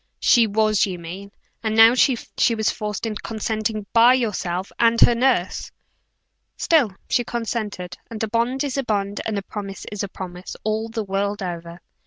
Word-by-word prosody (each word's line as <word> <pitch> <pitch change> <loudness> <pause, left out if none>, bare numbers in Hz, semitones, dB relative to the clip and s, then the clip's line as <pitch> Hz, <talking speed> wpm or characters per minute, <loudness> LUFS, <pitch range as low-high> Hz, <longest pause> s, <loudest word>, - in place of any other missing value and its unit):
"She 235 -2 +5
was, 215 0 +2
you 185 -2 -4
mean. 180 +4 -8 0.3
You 220 - 0
know 225 +2 +7
she 245 -2 +2
was 220 -2 +1
forced 210 +1 -4
into 215 -2 -4
consenting 215 -1 -3
by 235 +2 +7
yourself 195 -6 -2
and 230 0 +4
her 240 - +7
nurse!" 235 -6 0 0.9
"Still 275 - +2
she 245 - +1
consented; 220 -6 -4
and 225 -2 -5
a - - 0
bond 235 +5 0
is 280 -2 -3
a 275 - 0
bond, 205 -3 -1
and 215 -2 -2
a 200 - -3
promise 195 -1 -7 0.2
a 200 - -2
promise, 180 -1 -8
all 220 +1 -1
the 225 -1 -3
world 200 +1 -2
over." 170 -1 -6
215 Hz, 170 wpm, -22 LUFS, 195-230 Hz, 0.9 s, know